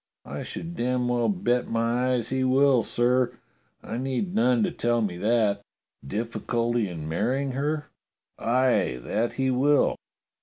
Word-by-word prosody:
" - - -64
I - - -6
should 170 +1 -6
damn 125 -1 0
well 120 -2 +1
bet 120 +6 0
my 120 +3 +1
eyes 120 -3 -1
he 130 0 0
will, 130 -1 +4
sir! 120 +2 +1 0.5
I 115 - -5
need 135 +9 -2
none 120 -1 +3
to - - 0
tell 120 0 0
me 100 -5 -1
that. 105 0 +1 0.4
Difficulty 115 - -1
in 80 -3 -6
marrying 125 - 0
her.? 145 +3 -1 0.5
Aye, 115 - +2
that 115 +2 -1
he 130 0 0
will. 140 +3 +3
120 Hz, 150 wpm, -26 LUFS, 115-130 Hz, 0.5 s, will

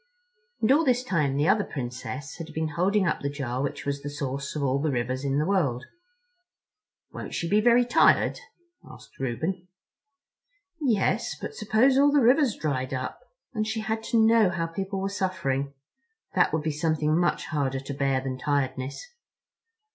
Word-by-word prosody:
And 220 - +3
all 300 +4 +5
this 250 -3 +2
time 150 - 0
the 145 +2 +2
other 205 +2 +4
Princess 130 0 -6
had 165 -2 -7
been 160 0 -1
holding 190 +6 +1
up 160 - 0
the 140 - -1
jar 130 -3 -3
which 140 - -4
was 140 0 -2
the 145 - -5
source 140 -1 -4
of 150 - -2
all 135 0 +1
the 155 - 0
rivers 130 0 -2
in 140 -1 -1
all - - +1
the 150 - +1
world. 150 -10 0 1.3
"Won't - - -7
she 170 - -2
be 210 +4 +3
very 240 +2 +5
tired?" 240 - +4 0.4
asked - - -15
Reuben. 160 +9 -3 1.1
"Yes, 230 -5 +1
but - - -6
suppose 235 +6 +3
all 285 +1 +5
the 290 - +4
rivers 255 0 +4
dried 130 -3 -2
up—and 215 - -6
she 220 0 -2
had 220 +1 -2
to 235 - +1
know 225 -2 +5
how 170 -2 -2
people 195 +4 -4
were 195 - -1
suffering—that 185 - -3
would 160 -1 -1
be 155 - 0
something 155 0 0
much 175 +1 +1
harder 135 -4 -1
to 140 +1 -6
bear 135 -1 0
than 130 -1 -4
tiredness. 135 - -2
160 Hz, 170 wpm, -26 LUFS, 140-215 Hz, 1.3 s, all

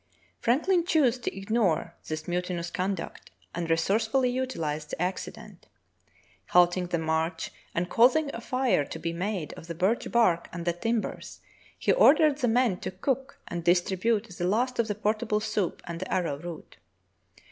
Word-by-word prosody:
Frank 255 +9 +1
lin 365 -3 +4
chose 280 -8 +2
to 235 - -4
ignore 195 -5 0
this 155 0 -4
mutinous 175 -1 -2
conduct 185 -1 -4 0.2
and 170 -1 -3
resource 195 +7 +2
fully 250 +2 +2
utilized 165 -13 -3
the - - -5
accident. 180 +2 -5 0.8
Halting 180 0 +4
the 175 -1 0
march 160 +1 -1 0.2
and 175 +1 0
causing 265 +8 +4
a 230 - -6
fire 255 - +1
to - - -7
be 170 - -3
made 180 -2 -3
of 165 - -11
the 170 - -5
birch 190 +7 0
bark 185 -8 +3
and 170 0 -6
the 175 - +1
tim 225 +6 0
bers, - - -8 0.4
he - - +1
ordered 305 - +5
the 245 - +1
men 235 -4 +2
to - - -4
cook 265 +8 -3
and 170 -1 -4
distribute 190 +6 +2
the 175 - -1
last 245 +5 0
of 230 - +2
the 210 - -2
portable 215 +1 0
soup 210 -4 -2
and 170 -1 -5
the 185 - -6
arrow 170 -6 0
root. 170 -1 -9
195 Hz, 170 wpm, -28 LUFS, 170-235 Hz, 0.8 s, ordered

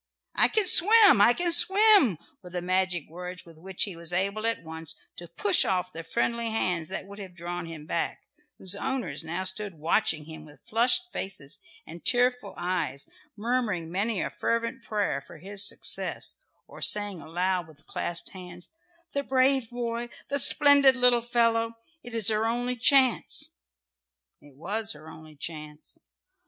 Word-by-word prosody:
"I - - +4
can 430 -2 +1
swim! 400 - +7
I 235 - +6
can 345 +5 0
swim!" 385 - +6 0.2
were 180 - -12
the 180 0 -4
magic 185 -3 -1
words 180 +2 -8
with 165 -2 -17
which 190 +2 -3
he 195 -4 -4
was 170 0 -2
able 200 +5 -2
at 230 - -3
once 160 0 -7 0.2
to 175 - -9
push 195 +4 +2
off 180 -1 -2
the 165 - -7
friendly 235 +7 -2
hands 180 -7 -1
that - - -6
would 200 +1 -12
have 190 -3 -10
drawn 175 0 -6
him 160 -2 -9
back, - - -3 0.3
whose 190 0 +1
owners 195 - -4
now 170 +4 -4
stood 190 0 -1
watching 155 0 0
him 155 -1 -10
with 150 -1 -17
flushed 245 +11 +1
faces 155 -7 -5 0.3
and 170 +1 -12
tearful 245 -4 0
eyes, 175 -7 -3 0.3
murmuring 210 -7 -2
many 200 +3 -2
a - - -5
fervent 230 +3 -3
prayer 205 -9 -2
for 170 - -14
his 200 +4 +1
success, - - -1 0.3
or - - -14
saying 205 -5 +1
aloud 180 +2 -2
with 155 -2 -19
clasped 170 - -5
hands, 180 -2 -8 0.4
"The 280 - -1
brave 265 -2 +1
boy, 240 0 -5 0.2
the 280 +1 0
splendid 280 -1 +6
little 250 -1 +3
fellow! 230 -1 0 0.3
It 245 -1 -10
is 225 -3 +5
her 220 +1 0
only 245 +2 -2
chance!" 260 0 +3 0.9
It 145 -2 -19
was 210 +7 -2
her 155 +1 -15
only 155 -1 -13
chance. 150 -1 -9
195 Hz, 165 wpm, -26 LUFS, 170-240 Hz, 0.9 s, swim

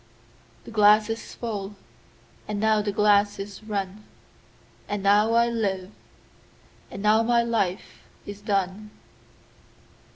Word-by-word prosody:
17The - - -10
glass 210 0 +5
is 225 - -7
full, 205 -4 -5 0.7
and 210 -1 -3
now 215 0 +2
the 205 0 -2
glass 205 0 +3
is 200 +1 -8
run,18And 155 - -8
now 210 +3 +4
I 235 0 +4
live, 200 -5 -2 1.0
and 195 - -8
now 215 +1 +4
my 235 +1 +2
life 215 -6 -2 0.2
is 205 0 -9
done. 200 0 -2
205 Hz, 110 wpm, -25 LUFS, 195-220 Hz, 1.0 s, glass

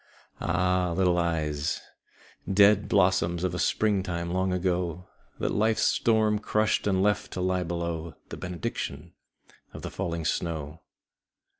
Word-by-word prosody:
II - - -3
Ah, 90 0 +1
little 90 -2 +3
eyes 75 -3 -1 0.7
Dead 100 +1 +5
blossoms 90 -3 +2
of 90 -2 0
a 90 - -3
springtime 95 -5 0
long 95 0 +1
ago, 90 -1 -1 0.3
That - - -1
life's 110 +1 +2
storm 110 -2 +3
crushed 105 0 +1
and 95 -1 +2
left 105 0 +1
to - - -4
lie 90 0 +1
below 85 -1 -4
The - - -6
benediction 90 -3 -5 0.6
of - - -9
the - - -5
falling 85 -4 -3
snow! 80 -2 -2
90 Hz, 135 wpm, -27 LUFS, 85-95 Hz, 0.7 s, Dead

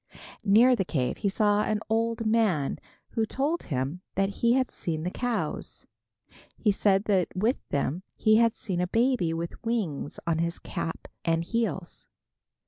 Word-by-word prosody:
Near 225 +5 +6
the 195 - 0
cave 135 -8 -1
he 200 - 0
saw 205 +1 +2
an 215 0 0
old 230 +1 0
man 215 -10 +2 0.3
who 225 - 0
told 285 +9 -1
him 135 +5 -3
that 195 0 +2
he 235 0 +5
had 260 0 +2
seen 160 -7 -4
the 180 - -2
cows. 245 +1 -3 0.7
He 210 - +3
said 195 -1 +3
that 195 -4 +2
with 220 +8 +2
them 145 +4 -1
he 215 0 +4
had 230 0 +4
seen 180 -4 -3
a 180 - 0
baby 235 -4 +2
with 165 +1 -5
wings 210 -12 -2
on 165 -2 +1
his 170 +1 -1
cap 165 - -5 0.2
and 165 0 +1
heels. 195 -3 -3
205 Hz, 160 wpm, -27 LUFS, 170-230 Hz, 0.7 s, Near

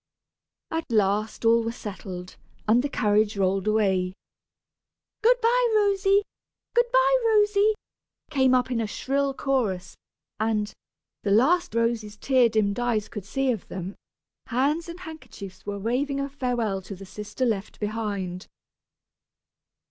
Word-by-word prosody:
At 325 -5 -3
last 215 +1 +1
all 230 +1 +5
were 230 - -2
settled, 190 -4 -7 0.3
and 230 +3 +5
the 285 - -2
carriage 210 -3 +2
rolled 195 0 +1
away. 190 -4 +1 1.1
"Good - - +5
by, 485 +2 +3
Rosy," 400 -1 +3 0.5
"Good 480 0 +4
by, - - +5
Rosy!" 420 -1 +4 0.6
came 265 -3 +4
up 250 0 +1
in 235 -2 0
a 220 - -1
shrill 275 +5 -1
chorus; 220 -11 -1 0.4
and, 215 -1 0 0.5
the 205 - -2
last 280 - +3
Rosy's 230 -2 0
tear 255 0 +3
dimmed 215 0 +1
eyes 235 -4 0
could 205 -3 -7
see 270 +5 0
of 220 -6 -4
them, 185 +1 -6 0.5
hands 290 +7 0
and 340 +2 -8
handkerchiefs 220 - -10
were 200 0 -3
waving 260 +7 -1
a 275 0 -2
farewell 240 -8 -1
to 195 +1 -8
the 195 +1 -10
sister 210 +6 -4
left 215 -4 -2
behind. 205 -4 -3
230 Hz, 135 wpm, -26 LUFS, 205-280 Hz, 1.1 s, all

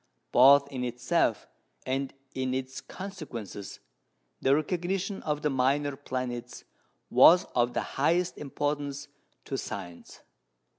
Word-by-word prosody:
Both 140 +3 +7
in 130 -2 -3
itself 125 0 0 0.4
and 135 +1 -1 0.2
in 130 0 -1
its 130 0 -4
consequences 135 - -8 0.6
the 135 +1 +4
recognition 180 +5 -2
of 150 -1 -2
the 150 - +1
minor 135 +2 +1
planets 125 -3 -5 0.5
was 175 +2 +7
of 120 0 +2
the - - +1 0.2
highest 175 +4 +2
importance 145 0 -3 0.4
to 135 - -3
science. 85 -4 -8
140 Hz, 110 wpm, -28 LUFS, 125-150 Hz, 0.6 s, Both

